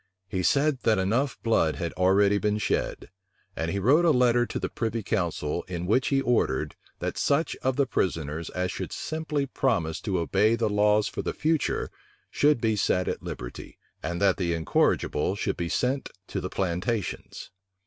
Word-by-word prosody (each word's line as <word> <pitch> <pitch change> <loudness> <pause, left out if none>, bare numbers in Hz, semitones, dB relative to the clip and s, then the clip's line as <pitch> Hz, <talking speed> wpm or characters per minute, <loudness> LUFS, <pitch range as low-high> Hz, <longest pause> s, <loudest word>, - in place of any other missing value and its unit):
He 95 0 -2
said, 140 +7 +2
that 110 - +3 0.5
blood 110 -8 +3
enough - - -9
had 85 -2 -3
already 100 +2 +3
been 105 0 0
shed; 105 - -2 0.4
and 80 +2 -2
he 100 - -2
wrote 135 - +4
a 170 - +5
letter 120 -3 +3
to - - -4
the - - -2
privy 115 -1 -3
council, 85 -5 -1
in 90 -1 -4
which 125 +7 +2
he 135 -1 +2
ordered, 125 -3 0 0.2
that - - -3
such 145 +4 +1
of 130 0 -1
the 140 - +2
prisoners 80 - -2
as 90 0 -2
should - - -5
simply 155 -2 -2
promise 85 -12 -1
to 95 -3 -1
obey 100 +6 +2
the 115 -2 0
laws 105 +1 +3
for - - -4
the - - -3
future, 160 -1 0 0.4
should 150 -3 +3
be 110 -1 +1
set 90 -2 +1
at - - -2
liberty, 60 0 -8 0.2
and 85 +4 -3
that 100 -2 +3
the 85 -3 0
incorrigible 80 +1 +1
should - - -1
be 85 -1 -3
sent 130 +8 0 0.2
to - - -4
the - - -4
plantations. 95 +4 -3
105 Hz, 180 wpm, -27 LUFS, 90-125 Hz, 0.5 s, a